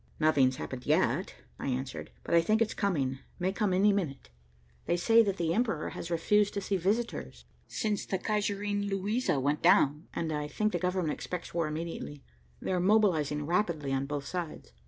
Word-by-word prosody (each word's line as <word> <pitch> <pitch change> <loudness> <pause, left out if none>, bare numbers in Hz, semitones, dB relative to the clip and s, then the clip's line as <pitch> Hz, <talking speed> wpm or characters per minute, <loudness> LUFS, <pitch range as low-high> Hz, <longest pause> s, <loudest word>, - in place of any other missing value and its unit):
"Nothing's 140 -5 +4
happened 130 -1 -6
yet," - - +1 0.2
I - - -4
answered. 130 0 -3
"But - - -3
I 170 - +7
think 215 +6 +2
it's 225 -1 +1
coming, 140 -10 0 0.2
may 185 +1 -1
come 205 -1 0
any 200 +3 +4
minute. 150 - -3 0.6
They 175 - +2
say 225 +6 +5
that 200 -3 0
the 165 -1 0
Emperor 215 -8 0
has 170 - -7
refused 205 +5 +2
to 200 - -1
see 195 +1 -1
visitors, 210 +6 -2 0.2
since 210 -3 -2
the 190 - 0
Kaiserin 205 0 -1
Luisa 200 - 0
went 145 +3 0
down, 150 +3 +4
and 160 -2 -1
I 150 0 -2
think 215 +7 0
the 175 - -1
government 180 -3 0
expects 180 -2 -6
war 165 -2 0
immediately. 155 -2 -5 0.4
They're 185 - -1
mobilizing 175 -7 +2
rapidly 165 -5 0
on 135 +1 -1
both 145 -1 -3
sides." 165 - -5
175 Hz, 175 wpm, -30 LUFS, 150-205 Hz, 0.6 s, I